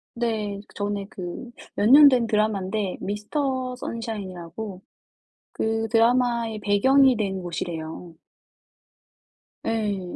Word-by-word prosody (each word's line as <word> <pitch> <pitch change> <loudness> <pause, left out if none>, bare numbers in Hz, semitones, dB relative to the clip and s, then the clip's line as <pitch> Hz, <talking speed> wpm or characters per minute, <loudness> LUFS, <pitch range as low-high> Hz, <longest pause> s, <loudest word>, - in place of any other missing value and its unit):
네. 220 -4 -2 0.2
전에 205 -1 -2
그 185 +6 -7 0.2
몇 205 - +2
년 290 +1 +10
된 250 -3 +2
드라마인데 210 -2 -1
미스터 255 +5 -2
선샤인이라고 200 -5 -6 0.7
그 225 0 -1
드라마의 235 -1 +2
배경이 260 +6 +4
된 195 -3 -2
곳이래요. 170 -1 -6 1.5
예. 205 -5 -2
215 Hz, 205 characters per minute, -24 LUFS, 195-235 Hz, 1.5 s, 년